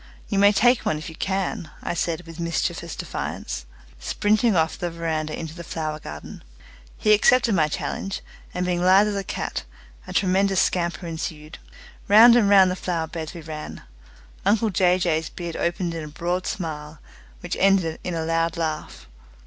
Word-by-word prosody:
"You 200 - +1
may 200 +1 +7
take 240 +3 +4
one 155 - 0
if 155 - -7
you 160 - -10
can," 190 -1 -2
I - - -2
said 170 0 -2
with 165 0 -11
mischievous 170 0 -2
defiance, 60 0 -5 0.3
springing 215 +1 +1
off 160 -1 +2
the 175 - -3
veranda 160 -2 -3
into 160 -2 -6
the 170 0 -8
flower 155 -2 -4
garden. 75 - -9 0.6
He 215 - +4
accepted 235 +2 +4
my 160 -5 +3
challenge, 195 +5 -4 0.3
and, 180 0 -2
being 175 -1 0
lithe 190 +3 +5
as 205 - -3
a 200 - -2
cat, - - -4 0.5
a - - -7
tremendous 195 0 +2
scamper 175 0 0
ensued. 160 -1 -6 0.5
Round 230 +3 +8
and 220 -4 +4
round 190 -2 +6
the - - -2
flower 170 -3 -2
beds 160 0 -6
we 170 - -7
ran. 155 -1 -8 0.6
Uncle 210 +2 +2
Jay 180 0 +3
Jay's 160 -3 0
beard 170 -2 -6
opened 170 0 -1
in 165 -1 -5
a - - -7
broad 175 +4 -2
smile, 155 -5 -5 0.4
which - - -3
ended 190 -5 +3
in 180 - -3
a 160 -1 -2
loud 165 0 0
laugh. 155 -2 -4
175 Hz, 175 wpm, -24 LUFS, 160-195 Hz, 0.6 s, Round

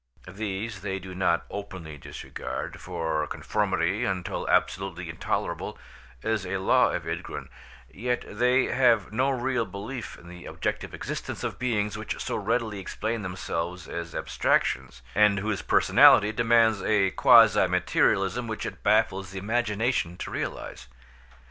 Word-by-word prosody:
These 100 +1 -4
they 95 -1 -3
do 95 -1 -8
not 90 -2 +1
openly 95 -6 -7
disregard, - - -6
for 80 -4 -2
conformity 100 +2 0
until 95 -6 -2
absolutely 90 -2 0
intolerable 80 - -3 0.5
is 110 -3 0
a 95 +1 -2
law 95 - +4
of - - -3
Ydgrun, - - -5 0.4
yet 120 - -2
they 125 +2 +2
have 125 -4 +2
no 130 +4 +2
real 130 -2 0
belief 110 +4 -7
in 85 - -15
the 90 0 -10
objective - - -3
existence - - -5
of - - -4
beings 105 -4 -1
which - - -4
so - - -3
readily 110 -4 -1
explain 110 +4 -3
themselves 90 -2 -4
as 85 -1 -6
abstractions, 65 -1 0
and 105 -1 +4
whose 105 0 -1
personality 105 +1 +6
demands 115 -1 +3
a 100 -3 +2
quasi - - +6
materialism 95 +5 +1
which 110 -1 -4
it - - -6
baffles 100 -3 +2
the 95 - -8
imagination 110 -3 0
to - - -6
realise. - - -5
100 Hz, 135 wpm, -27 LUFS, 90-115 Hz, 0.5 s, personality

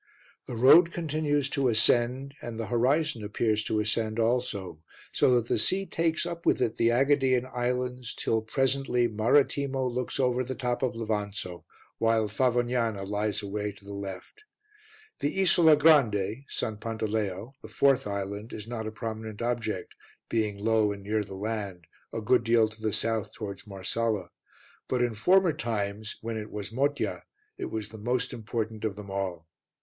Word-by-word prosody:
The - - -5
road 160 +9 +7
continues 150 -4 0
to 140 -3 +1
ascend 120 +4 +3
and 115 -1 -6
the 115 - -2
horizon 125 +2 +1
appears 110 +1 0
to 110 - 0
ascend 110 +1 0
also, 105 -8 -1 0.3
so 125 - +4
that 120 -1 +1
the - - +1
sea 190 - +2
takes 165 -2 0
up 170 -1 -5
with - - +3
it 115 -3 0
the 115 - +3
AEgadean 130 0 +3
islands 125 0 -2
till, 110 -1 0
presently, 130 +1 +1
Marettimo 135 +4 +2
looks 125 +2 -2
over 125 -1 +2
the 130 +1 -5
top 125 -1 -2
of 130 -3 0
Levanzo, 105 -5 -3 0.3
while 115 -1 +2
Favognana 120 -2 +1
lies 105 0 -1
away 105 +1 -3
to 100 - -18
the 100 - -8
left. 100 - -7 0.8
The 145 +7 -1
Isola 170 -4 +6
Grande 135 -6 +3
(S. - - -5 0.2
Pantaleo), 110 -1 -3
the - - -9
fourth 135 -5 +2
island, 100 +2 -4
is 105 0 -7
not 115 -2 -4
a - - -4
prominent 110 -1 -6
object, 120 -2 -2 0.4
being 105 -3 0
low 110 0 +2
and 100 -1 -7
near 105 +1 0
the 100 -1 -9
land, 100 -4 -4 0.3
a 115 - -4
good 120 +3 +3
deal 115 -1 +4
to 110 0 -14
the 110 -1 0
south 110 0 -1
towards 100 -2 -7
Marsala; 100 0 -2 0.6
but 125 -1 +1
in 120 -2 0
former 180 - +4
times, 105 -2 -3
when 115 0 -4
it 105 0 -6
was 105 0 -6
Motya, 140 +4 0 0.4
it - - -2
was 110 -2 -4
the 110 - -10
most 120 +3 -1
important 110 -1 -4
of 110 -3 -1
them 100 -1 -9
all. 95 -4 -3
115 Hz, 165 wpm, -28 LUFS, 105-125 Hz, 0.8 s, road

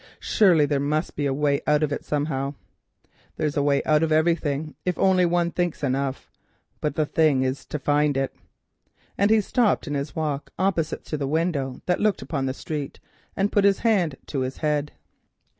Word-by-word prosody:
Surely 175 -8 +4
there 145 -1 0
must 150 +3 -1
be 145 -1 0
a - - 0
way 140 0 +1
out 150 0 +3
of 150 - 0
it 145 - -3
somehow. 145 -1 -2 0.8
There's 150 -2 -1
a 145 - +2
way 140 -1 +2
out 155 0 +3
of 160 -1 +1
everything 155 -2 +1
except - - -53
Death 180 - +1
if - - -25
only 185 -1 +4
one 170 0 +1
thinks 175 -4 -2
enough, 135 0 -2 0.5
but 150 -1 -2
the 155 - +1
thing 150 -4 +2
is 130 +1 -3
to - - -3
find 145 0 +1
it," 135 0 -1 0.8
and 200 +1 +2
he 220 0 +5
stopped 225 +2 +1
in 145 - -4
his 140 +1 -3
walk 150 -3 -2
opposite 180 -4 -1
to 155 - -3
the 140 -2 -2
window 145 -4 -1
that 180 - 0
looked 210 -1 +1
upon 140 -4 -2
the 130 - -1
street, 145 -2 -5 0.4
and 195 +1 +1
put 205 - +3
his 200 -1 +3
hand 185 -10 +2
to 140 - -3
his 130 +1 -3
head. 150 -1 -1
150 Hz, 200 wpm, -24 LUFS, 140-170 Hz, 0.8 s, he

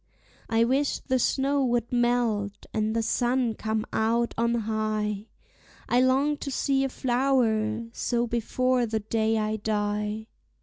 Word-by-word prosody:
I 225 0 +3
wish 270 +4 +1
the 260 -1 -1
snow 275 +3 +1
would 240 -2 0
melt 240 -4 0
and 215 0 0
the 230 - +1
sun 240 +1 +1
come 220 0 -2
out 230 +2 +1
on 235 +1 +1
high, 215 -1 -2 0.6
I 245 +1 +3
long 270 +3 +2
to 280 - -5
see 270 0 +1
a 270 - 0
flower 240 -4 +1
so 240 0 -1
before 245 +1 0
the 220 0 -2
day 220 +1 0
I 215 0 -1
die. 210 0 -2
230 Hz, 140 wpm, -26 LUFS, 220-255 Hz, 0.6 s, I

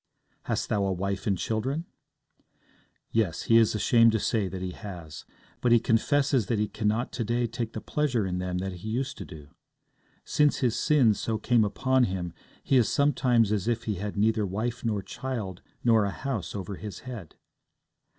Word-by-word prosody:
'Hast - - -1
thou 100 - +1
a 95 - 0
wife 100 +2 -2
and 100 -2 +2
children?' 130 - -2 1.3
Yes; 110 -8 0
he 115 - +5
is 115 -1 +4
ashamed 115 +1 +5
to 110 - +2
say 105 -1 0
that 95 0 -5
he 90 - -3
has. 85 -6 -9 0.4
But 125 - +2
he 120 - +7
confesses 135 +1 +2
that 115 - 0
he 105 0 +1
cannot 110 +3 -1
to 115 - -2
day 120 +2 0
take 115 0 -4
the 110 - -5
pleasure 130 -8 0
in 90 -1 -2
them 90 0 -2
that 95 0 -4
he 110 +5 -7
used 130 +5 -2
to - - -6
do. 75 -4 -12 0.8
Since 150 -1 +3
his 125 -4 +1
sin 135 -8 +4
so 110 +2 -2
came 115 +1 +3
upon 130 +4 +2
him, 90 -3 -3 0.3
he 135 - +3
is 120 - +3
sometimes 125 -6 +3
as 105 0 0
if 120 0 0
he 110 - -1
had 105 0 -4
neither 110 +1 +2
wife 110 +5 -3
nor 105 -4 -1
child 110 -10 -5 0.2
nor 115 -3 +5
a 100 - 0
house 110 -7 -4
over 100 -1 -5
his 105 -2 -7
head. 120 - -8
110 Hz, 190 wpm, -27 LUFS, 100-120 Hz, 1.3 s, he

